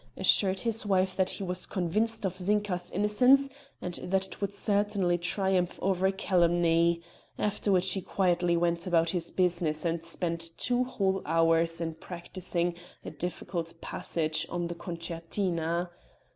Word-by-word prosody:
assured 190 -2 +3
his 225 -2 0
wife 190 -2 +1
that 190 -1 +1
he - - -3
was 180 -1 -1
convinced 215 +5 -1
of 185 -1 -1
Zinka's 185 -2 0
innocence, 250 +7 +4 0.3
and 180 -1 -4
that 190 +1 0
it - - -9
would 200 -1 -1
certainly 200 -3 +1
triumph 180 0 0
over 190 0 +1
calumny; 170 -2 +2 0.3
after 210 0 0
which 185 0 +3
he 190 - -2
quietly 175 -2 +1
went 170 +1 0
about 165 -2 +3
his 170 -2 -1
business 170 -4 0
and 165 0 -1
spent 165 -1 -3
two 245 0 +1
whole 195 -6 0
hours 165 +1 +2
in 165 -1 -2
practising 175 +1 -3 0.3
a - - -5
difficult 170 -1 -4
passage 160 -2 -2
on 175 0 -2
the - - -3
concertina. 170 0 -3
180 Hz, 145 wpm, -29 LUFS, 170-195 Hz, 0.3 s, innocence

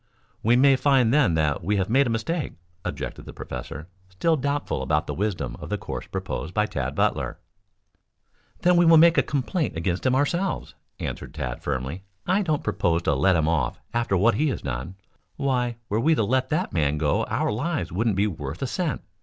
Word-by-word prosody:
"We 115 +3 +4
may 135 +2 +6
find, 130 -4 +3
then, 135 - +4
that 75 -2 0
we 105 +4 +1
have 95 -1 0
made 135 +4 +3
a - - -1
mistake," 130 +9 -2 0.3
objected - - -5
the - - -8
professor, 70 +5 -7 0.2
still 160 - +1
doubtful 145 - -1
about 75 +3 +1
the - - -4
wisdom 85 - -2
of - - -8
the - - -1
course - - -6
proposed 80 +4 -4
by 105 - +3
Tad - - -3
Butler. - - 0 1.3
"Then 180 0 +5
we 175 - +5
will 165 0 +8
make 165 +1 +6
a - - +6
complaint 145 - -2
against 85 +2 -1
him 130 0 +2
ourselves," 170 +8 0 0.3
answered - - -5
Tad 65 -5 -4
firmly. 70 +5 -3 0.2
"I 190 +3 +2
don't 155 -6 0
propose 85 -5 0
to - - +2
let 80 +8 +3
him 80 -2 +2
off 75 -7 0
after 115 -5 +1
what 110 +5 +4
he 150 +9 +1
has 135 - -2
done. 70 +7 -4 0.4
Why, 125 -4 0
were 105 - 0
we 160 +7 +3
to 115 - +1
let 130 +4 +1
that 170 +5 -1
man 75 -3 +1
go 75 -1 +1
our - - 0
lives 145 +9 -2
wouldn't 110 +3 +1
be 100 +2 +2
worth 80 - -4
a - - 0
cent. 170 +3 -2
110 Hz, 200 wpm, -25 LUFS, -, 1.3 s, will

